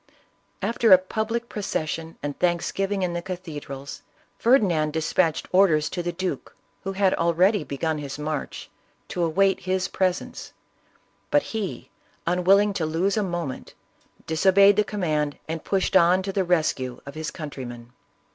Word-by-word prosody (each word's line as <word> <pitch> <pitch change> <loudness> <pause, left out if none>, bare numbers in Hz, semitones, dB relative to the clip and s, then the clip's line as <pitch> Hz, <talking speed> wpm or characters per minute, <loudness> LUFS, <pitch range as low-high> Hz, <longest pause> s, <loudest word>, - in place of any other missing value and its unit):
After 230 -1 +2
a 185 - +11
public 220 +5 -3
procession 165 -6 -4
and 145 -1 -4
thanksgiving 190 +3 0
in 175 -1 -1
the 175 - -2
cathedrals, 150 -7 -7 0.4
Ferdinand 180 - +3
dis 160 0 -2
patched 165 -4 +1
orders 165 -6 +4
to 180 - -3
the 175 0 -2
duke, 175 -5 -4 0.3
who 195 - -3
had 195 -1 +2
already 175 +4 +2
begun 150 +3 -2
his 140 -1 -6
march, 150 0 -5 0.4
to 175 - -1
await 190 +4 +2
his 185 0 -1
presence; 185 -1 -2 0.8
but 290 0 +3
he, 215 -4 -4 0.3
unwilling 195 +4 +3
to 170 -5 -1
lose 175 +6 0
a 215 - +1
moment, 175 -8 -4 0.5
disobeyed 195 +5 +5
the 210 - +3
command, 155 -8 -1
and 160 0 -4
pushed 195 -1 0
on 185 +1 +5
to 195 0 -4
the 195 - +1
rescue 155 -8 0
of 140 - -8
his 155 +1 -4
countrymen. 125 -7 -8
175 Hz, 145 wpm, -24 LUFS, 155-195 Hz, 0.8 s, a